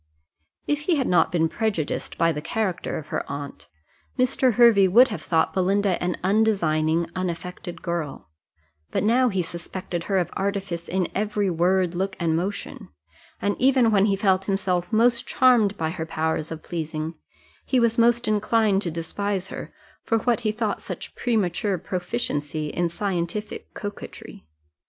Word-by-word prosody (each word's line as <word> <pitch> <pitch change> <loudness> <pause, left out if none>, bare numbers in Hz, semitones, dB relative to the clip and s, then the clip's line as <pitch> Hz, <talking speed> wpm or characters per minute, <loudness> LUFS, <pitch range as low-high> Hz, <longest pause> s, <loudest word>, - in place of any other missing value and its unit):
If 295 0 0
he 350 - +3
had 270 -3 0
not 175 -3 +3
been 165 -2 +2
prejudiced 200 -5 -2
by 165 0 +3
the 150 -2 -4
character 185 +1 -2
of 150 - -8
her - - -2
aunt, 140 0 -7 0.5
Mr. 255 0 +2
Hervey 230 -5 +6
would 240 +8 +6
have 210 - -5
thought 160 -2 +1
Belinda 195 0 +1
an 180 0 -1
undesigning, 170 -6 +2
unaffected 180 -1 -5
girl; 165 - -4 0.6
but - - -1
now 245 +4 +4
he 190 -4 0
suspected 170 0 -5
her 195 - +1
of 180 - 0
artifice 195 -3 -3
in 185 -1 0
every 205 -1 0
word, 180 +1 +2
look, 190 +2 -2
and 165 -2 +1
motion; 190 +5 -4 0.5
and 205 0 0
even 255 -3 +4
when 200 -1 +4
he 200 -2 +2
felt 190 -1 +2
himself 190 -2 -1
most 235 +2 +3
charmed 230 -6 +4
by 160 -1 -1
her 165 -2 -5
powers 160 -1 -1
of 160 -1 -7
pleasing, 160 -1 -4 0.5
he 260 - +1
was 235 -1 +2
most 235 0 +3
inclined 215 -1 +2
to 180 - -2
despise 190 +4 -3
her, - - -7 0.3
for 225 - +1
what 235 0 +1
he 215 - 0
thought 215 -1 -2
such - - -7
premature 205 -4 0
proficiency 160 -5 -3
in 175 +3 -1
scientific 190 +3 -3
coquetry. 200 - -8
190 Hz, 155 wpm, -24 LUFS, 170-215 Hz, 0.6 s, Hervey